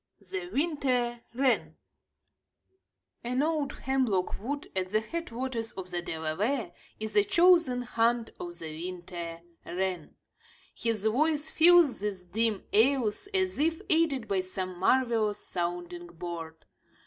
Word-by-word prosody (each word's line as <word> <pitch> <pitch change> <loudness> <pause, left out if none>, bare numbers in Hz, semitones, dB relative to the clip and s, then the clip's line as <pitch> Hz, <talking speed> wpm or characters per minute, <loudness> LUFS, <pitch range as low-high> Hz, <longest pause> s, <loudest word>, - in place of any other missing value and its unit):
THE 385 -2 -6
WINTER 255 -6 0
WREN 260 0 +1 1.5
An 250 +3 0
old 305 -3 0
hemlock 255 -9 0
wood 285 +6 -4
at 185 -1 -1
the 215 +2 +2
head 335 +10 -5
waters 235 -1 -4
of 185 -1 -7
the 175 -1 -2
Delaware 175 - -2 0.3
is 220 0 -5
a 415 - +6
chosen 345 -10 +4
haunt 235 -1 +1
of 175 0 -6
the 160 -2 -6 0.2
winter 170 -2 -7 0.2
wren. 180 -3 -3 0.6
His 225 -3 -2
voice 295 +7 +1
fills 340 -4 +7
these 200 -2 -3
dim 220 +2 0
aisles, 235 - +3
as 375 -4 0
if 320 +2 +2
aided 310 -7 +3
by 195 -2 +1
some 185 -1 -4
marvelous 225 -1 +2
sounding 175 -2 -4
board. 170 -1 -7
230 Hz, 125 wpm, -29 LUFS, 185-280 Hz, 1.5 s, fills